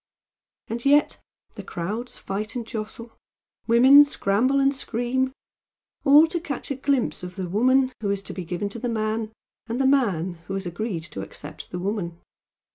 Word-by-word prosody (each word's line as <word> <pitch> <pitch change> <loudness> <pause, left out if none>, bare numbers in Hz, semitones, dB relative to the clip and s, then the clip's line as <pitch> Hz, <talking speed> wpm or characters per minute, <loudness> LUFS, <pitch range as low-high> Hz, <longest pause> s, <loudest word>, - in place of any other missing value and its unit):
And 235 +1 -4
yet 290 +2 +3 0.3
the - - -8
crowds 210 +8 -5
fight 210 +4 -4
and 240 -2 -3
jostle, 225 0 -7 0.5
women 260 +5 +8
scramble 255 0 +1
and 275 0 +3
scream, 260 0 -1 0.7
all 295 +2 +8
to 345 +1 -2
catch 285 -3 -5
a - - 0
glimpse 270 -1 0
of 180 0 -8
the 185 -2 -4
woman 255 +7 +3
who 205 - -1
is 200 0 -1
to - - -6
be 185 - -5
given 175 +4 -3
to 235 - -7
the 245 - -2
man, 220 -1 -1 0.4
and 235 +2 -3
the 270 - +2
man 190 - +1
who 195 - -3
has 195 -1 -4
agreed 175 0 -3
to 160 -2 -7
accept 150 +1 -9
the 180 - -5
woman. 175 -3 -3
225 Hz, 175 wpm, -24 LUFS, 195-260 Hz, 0.7 s, women